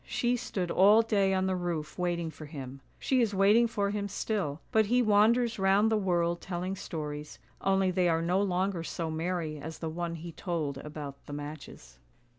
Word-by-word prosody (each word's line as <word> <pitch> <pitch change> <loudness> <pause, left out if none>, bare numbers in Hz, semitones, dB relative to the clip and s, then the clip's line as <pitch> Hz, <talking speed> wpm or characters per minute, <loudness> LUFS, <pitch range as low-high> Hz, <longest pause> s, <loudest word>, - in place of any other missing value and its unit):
She 245 0 +1
stood 185 -6 -3
all 210 +4 +6
day 200 -4 +2
on 190 0 +1
the 190 0 0
roof 170 -4 -3
waiting 170 -2 -1
for 155 -1 -10
him; 135 -3 -8 0.2
she 260 -2 +1
is 215 -4 +1
waiting 210 +5 +5
for 200 -3 -1
him 205 -1 -2
still, 200 -7 -2
but 220 -1 +3
he 245 +3 +3
wanders 225 +2 +3
round 195 +3 +4
the - - +3
world 175 -4 +1
telling 185 +1 -3
stories, 150 - -6 0.2
only 195 -1 +2
they 180 -1 +2
are 165 0 +1
no 180 +3 +2
longer 190 -2 0
so 165 -1 -4
merry 160 -1 -2
as 160 +3 -7
the 165 - -4
one 170 +1 -3
he 170 +1 -7
told 155 -6 -3
about 145 -2 -8
the 145 - -7
matches. 145 - -9
180 Hz, 190 wpm, -30 LUFS, 160-200 Hz, 0.2 s, all